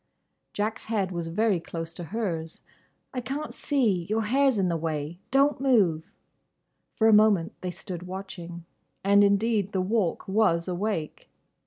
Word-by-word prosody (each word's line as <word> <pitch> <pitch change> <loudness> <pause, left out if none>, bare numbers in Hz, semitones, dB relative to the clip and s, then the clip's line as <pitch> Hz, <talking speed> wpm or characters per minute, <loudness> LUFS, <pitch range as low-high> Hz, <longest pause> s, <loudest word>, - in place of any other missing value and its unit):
Jack's 215 +2 -2
head 205 -4 -1
was 170 -2 -3
very 200 +2 +1
close 165 0 -6
to 175 - -7
hers. 165 -5 -4 0.5
"I 250 - -2
can't 280 +5 -4
see; 215 - 0
your 220 +1 +1
hair's 265 +2 +3
in 190 -2 +2
the 170 - 0
way. 160 0 -3
Don't 275 +1 +3
move!" 195 -12 +2 0.9
For 220 - +3
a 220 - +6
moment 210 -5 +4
they 185 - -3
stood 180 0 -7
watching. 175 -3 -7 0.4
And 200 +1 +5
indeed 205 0 +2
the 190 - +1
Walk 190 -2 0
was 190 -4 +2
awake. 180 -3 -3
195 Hz, 150 wpm, -27 LUFS, 170-220 Hz, 0.9 s, a